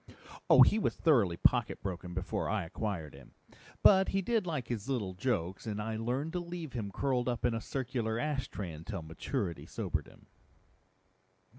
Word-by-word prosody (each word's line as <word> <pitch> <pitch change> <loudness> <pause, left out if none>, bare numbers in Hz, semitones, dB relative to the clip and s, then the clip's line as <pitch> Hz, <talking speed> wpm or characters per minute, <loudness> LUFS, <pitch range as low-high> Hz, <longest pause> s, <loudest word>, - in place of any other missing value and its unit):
"Oh, - - +10
he 215 - +4
was - - 0
thoroughly 115 - +3
pocket - - +2
broken 90 -2 -5
before 95 +3 -2
I 110 -3 0
acquired 85 -4 -4
him. 70 -2 -15 0.5
But 190 -1 +7
he 195 0 0
did 220 -2 +1
like 145 -8 -2
his 120 0 -4
little 105 -9 -1
jokes, 95 -2 -2
and 105 -1 -2
I 110 +1 -2
learned 125 +8 -2
to 180 - 0
leave 170 -4 -6
him 110 -5 -3
curled 125 +2 0
up 120 0 -1
in 120 - +2
a 115 - -2
circular 120 -4 -2
ashtray 135 - -2
until 80 +4 -6
maturity 80 +2 -3
sobered - - -3
him." - - -18
115 Hz, 170 wpm, -32 LUFS, 95-135 Hz, 0.5 s, Oh